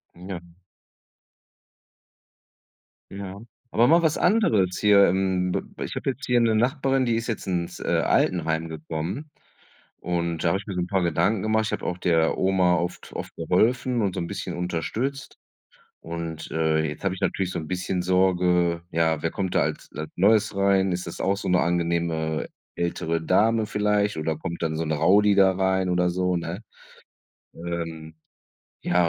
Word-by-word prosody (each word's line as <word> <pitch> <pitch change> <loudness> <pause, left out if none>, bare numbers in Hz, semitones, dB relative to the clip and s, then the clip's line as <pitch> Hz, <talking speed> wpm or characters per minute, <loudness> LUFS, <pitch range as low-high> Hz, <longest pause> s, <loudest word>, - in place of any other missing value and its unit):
M 90 +2 -11
ja. 95 -3 -4 2.7
Ja. 100 0 -7 0.3
Aber 120 +2 +4
mal 165 +4 +5
was 160 -1 +2
anderes 110 - +2
hier 100 -1 +6
im 95 0 0
bib - - -2 0.2
ich - - -4
habe - - -1
jetzt 130 0 -8
hier 125 -1 +3
'ne 115 -2 +3
Nachbarin, 135 +3 +1
die 120 -2 +1
ist 115 +1 -2
jetzt 115 -4 -4
ins, 85 -2 -2
äh, - - -6 0.2
Altenheim 80 -2 +1
gekommen, 80 - -5 0.7
und 85 -1 -2
da - - +4
habe 95 - +1
ich 100 - -11
mir 100 - -5
so 90 - -1
'n 90 - -1
paar 95 0 0
Gedanken 95 +5 +1
gemacht. 110 0 +1
Ich - - -3
habe - - -3
auch 90 - -3
der 80 -3 +2
Oma 95 -2 +3
oft 90 0 -4
oft - - -6
geholfen 120 +8 +1
und 95 -3 0
so - - -2
'n 85 - -3
bisschen 90 -1 -5
unterstützt. 110 - -3 0.6
Und, 80 -1 -6
äh, 80 -1 +1
jetzt 75 +4 -8
habe 95 -2 +1
ich 95 - -10
natürlich 95 -2 -1
so - - -3
'n 80 -2 -6
bisschen 90 0 -2
Sorge: 90 -2 +2
„Ja, 80 -2 +1
wer 80 - 0
kommt 95 0 -3
da - - +4
als - - -4
als 75 0 -5
Neues 100 +1 +3
rein? 95 -1 +3
Ist 90 +1 -3
das - - -7
auch 100 +1 +1
so - - -5
'ne 90 0 +3
angenehme 85 -2 -1 0.3
ältere 85 -1 -2
Dame 110 +6 +2
vielleicht 105 -1 +1
oder 80 0 -2
kommt 85 +1 -5
dann 80 -1 -1
so 80 - -1
'n 80 - -2
Rowdy 100 +7 +4
da 95 -1 +5
rein 95 -1 +1
oder 90 0 +2
so“, 90 0 0
ne? 85 +4 -4 0.9
Ähm. 80 -2 -6 0.7
Ja, 90 -1 +2
90 Hz, 175 wpm, -25 LUFS, 85-100 Hz, 2.7 s, hier